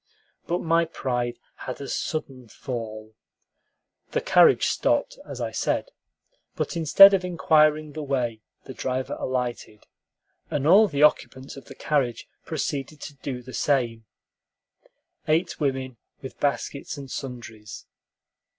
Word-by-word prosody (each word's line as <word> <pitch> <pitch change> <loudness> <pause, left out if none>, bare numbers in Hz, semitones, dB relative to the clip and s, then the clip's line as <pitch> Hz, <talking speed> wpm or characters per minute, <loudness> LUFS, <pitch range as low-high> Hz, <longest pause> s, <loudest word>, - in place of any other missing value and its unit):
But 175 +1 -1
my 165 +1 +3
pride 125 -6 -3 0.2
had 130 - -6
a 140 - -6
sudden 135 -6 -4
fall. 110 -3 -7 1.0
The - - +2
carriage - - +5
stopped, - - 0
as - - -6
I - - -3
said; - - -1 0.6
but - - -3
instead 195 +5 +8
of 190 -2 +2
inquiring 155 -3 +2
the 155 +2 -6
way, 125 -6 -2 0.2
the 130 - -9
driver 130 0 -3
alighted, 125 -4 -4 0.6
and 145 -1 -2
all 200 +7 +7
the 145 -5 0
occupants 135 -3 +1
of 135 -3 -11
the - - -12
carriage 135 -6 -1 0.2
proceeded 145 +2 -3
to 145 - -8
do 125 -2 -6
the 130 +1 -11
same, 120 -6 0 1.2
eight 160 +4 +1
women, 130 -4 -2 0.3
with 130 - -9
baskets 140 0 -2
and 135 -2 -9
sundries. 110 -5 -8
135 Hz, 130 wpm, -25 LUFS, 125-155 Hz, 1.2 s, instead